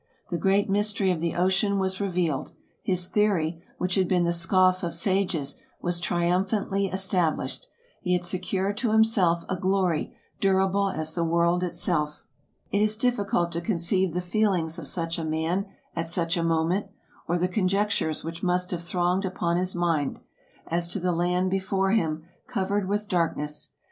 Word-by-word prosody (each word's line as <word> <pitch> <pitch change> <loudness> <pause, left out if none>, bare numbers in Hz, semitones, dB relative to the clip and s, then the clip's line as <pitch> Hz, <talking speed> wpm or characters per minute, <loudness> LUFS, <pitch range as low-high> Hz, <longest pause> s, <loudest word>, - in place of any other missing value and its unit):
The 175 - 0
great 195 +3 +2
mystery 205 -1 +1
of 175 - -1
the 170 0 -1
ocean 190 +3 +2
was 190 0 -1
revealed; 175 -7 -1 0.3
his 180 -2 0
theory, 180 -6 +1 0.2
which 180 0 -1
had 190 -1 +2
been 180 -1 +2
the 170 0 +1
scoff 185 +2 +3
of 170 -2 -2
sages, 185 -8 0 0.2
was 175 0 -1
triumph 175 +2 +1
antly 200 -2 0
established; 190 - 0 0.3
he 180 -2 0
had 180 0 +1
secured 185 +2 -1
to 230 -1 0
himself 200 -7 +3
a 185 - -1
glory 185 -3 0 0.2
durable 195 0 +2
as 160 -3 -2
the 170 - 0
world 170 +1 +2
itself. 150 -4 -1 0.5
It 200 - +2
is 215 0 +3
difficult 205 -8 +1
to 170 0 -2
conceive 180 -1 +1
the 180 - 0
feelings 180 -4 0
of 150 - -6
such 165 +1 -2
a - - -3
man, 160 +5 -1 0.3
at 165 0 -1
such 165 0 +1
a 170 - 0
moment; 165 +4 +1 0.4
or 175 - +1
the 180 +1 +1
conjectures 190 -3 0
which 165 +1 -6
must 180 -1 +1
have 175 -2 -2
thronged 175 +2 0
upon 175 -2 -1
his 185 +1 -1
mind, 165 -5 0 0.5
as 170 +1 -1
to 175 - -1
the 180 0 0
land 180 +2 +1
before 195 0 0
him, 160 -7 0 0.2
covered 200 -4 -1
with 210 +1 -1
dark 170 -4 +1
ness. 150 0 -3
180 Hz, 170 wpm, -26 LUFS, 170-195 Hz, 0.5 s, scoff